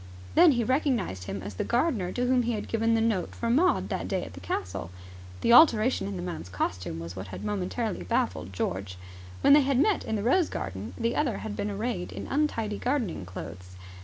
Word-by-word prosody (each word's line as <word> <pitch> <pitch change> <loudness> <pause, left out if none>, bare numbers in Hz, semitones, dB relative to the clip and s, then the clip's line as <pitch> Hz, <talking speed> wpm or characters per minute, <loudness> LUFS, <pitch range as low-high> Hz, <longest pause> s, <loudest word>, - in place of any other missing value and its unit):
Then 335 -2 +7
he 240 -2 +1
recognized 245 - 0
him 95 0 -5
as 100 +1 -6
the 90 - -2
gardener 235 - 0
to 250 - 0
whom 250 0 +3
he 240 0 -1
had 210 - -4
given 225 0 +1
the 225 - +2
note 220 -5 0
for 230 0 -1
Maud 350 +9 +3
that - - -3
day 190 -2 -1
at - - -10
the 90 - -9
castle. 90 -1 -4 0.5
The 235 - +4
alteration 245 - +6
in 100 - -4
the 90 - -5
man's 85 0 -5
costume 90 -1 -3
was 85 +2 -7
what 95 0 -6
had 95 - -7
momentarily 210 +1 -2
baffled 90 +1 -1
George. 95 0 -3 0.4
When 280 - +6
they 295 - +8
had 275 -1 +1
met 390 +6 +3
in 220 - -2
the 205 - -2
rose 305 - +3
garden, 95 +3 -5
the 230 +1 0
other 275 -7 0
had 210 -1 -4
been 205 - -2
arrayed 205 -2 -3
in - - -6
untidy 230 -8 -1
gardening 240 - -1
clothes. 90 0 -9
210 Hz, 215 wpm, -28 LUFS, -, 0.5 s, they